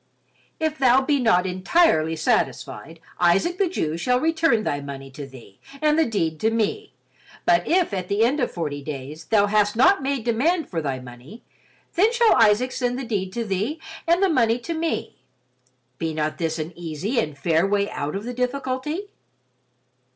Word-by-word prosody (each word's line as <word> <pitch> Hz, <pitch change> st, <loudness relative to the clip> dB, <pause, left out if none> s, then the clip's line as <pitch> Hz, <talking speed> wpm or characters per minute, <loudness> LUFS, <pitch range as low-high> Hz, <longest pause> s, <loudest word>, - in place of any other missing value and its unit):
If 315 Hz, -1 st, -1 dB
thou 260 Hz, 0 st, +5 dB
be 280 Hz, +1 st, +1 dB
not 225 Hz, -7 st, +3 dB
entirely 185 Hz, -, +2 dB
satisfied, 160 Hz, -2 st, -2 dB, 0.2 s
Isaac 195 Hz, -, +2 dB
the 390 Hz, -3 st, +2 dB
Jew 160 Hz, -, -2 dB
shall 250 Hz, +8 st, +1 dB
return 320 Hz, -7 st, +2 dB
thy 145 Hz, -8 st, -2 dB
money 135 Hz, -1 st, -8 dB
to 140 Hz, +1 st, -8 dB
thee 120 Hz, -7 st, -15 dB, 0.2 s
and 300 Hz, 0 st, +3 dB
the 320 Hz, -, +3 dB
deed 165 Hz, -8 st, -1 dB
to 220 Hz, -, +2 dB
me, 230 Hz, -, -2 dB, 0.5 s
but 345 Hz, 0 st, +3 dB
if 345 Hz, -, +2 dB
at 185 Hz, -2 st, -3 dB
the 205 Hz, +3 st, +1 dB
end 275 Hz, +6 st, +1 dB
of 245 Hz, -, 0 dB
forty 150 Hz, -4 st, -4 dB
days 145 Hz, +2 st, -7 dB
thou 210 Hz, -2 st, +3 dB
hast 205 Hz, 0 st, +2 dB
not 295 Hz, -, +4 dB
made 270 Hz, -3 st, -2 dB
demand 290 Hz, +9 st, +1 dB
for 165 Hz, -3 st, -2 dB
thy 135 Hz, -3 st, -2 dB
money, 125 Hz, -, -12 dB, 0.5 s
then 415 Hz, +6 st, +3 dB
shall 470 Hz, -1 st, +4 dB
Isaac 225 Hz, +4 st, +4 dB
send 245 Hz, -1 st, -1 dB
the 265 Hz, -, -4 dB
deed 195 Hz, -5 st, -2 dB
to 235 Hz, 0 st, -3 dB
thee 210 Hz, -, -2 dB, 0.3 s
and 345 Hz, +3 st, +3 dB
the -, -, +5 dB
money 235 Hz, -7 st, +2 dB
to 250 Hz, +7 st, -5 dB
me. 325 Hz, 0 st, -3 dB, 0.8 s
Be 160 Hz, -1 st, -2 dB
not 155 Hz, 0 st, -2 dB
this 165 Hz, -1 st, -1 dB
an 160 Hz, +2 st, -5 dB
easy 175 Hz, -, -3 dB
and 150 Hz, -9 st, -3 dB
fair 165 Hz, +5 st, +2 dB
way 200 Hz, 0 st, +1 dB
out 145 Hz, +4 st, -4 dB
of 200 Hz, -, -4 dB
the 245 Hz, +2 st, -5 dB
difficulty?" 260 Hz, -, -3 dB
220 Hz, 180 wpm, -23 LUFS, -, 0.8 s, thou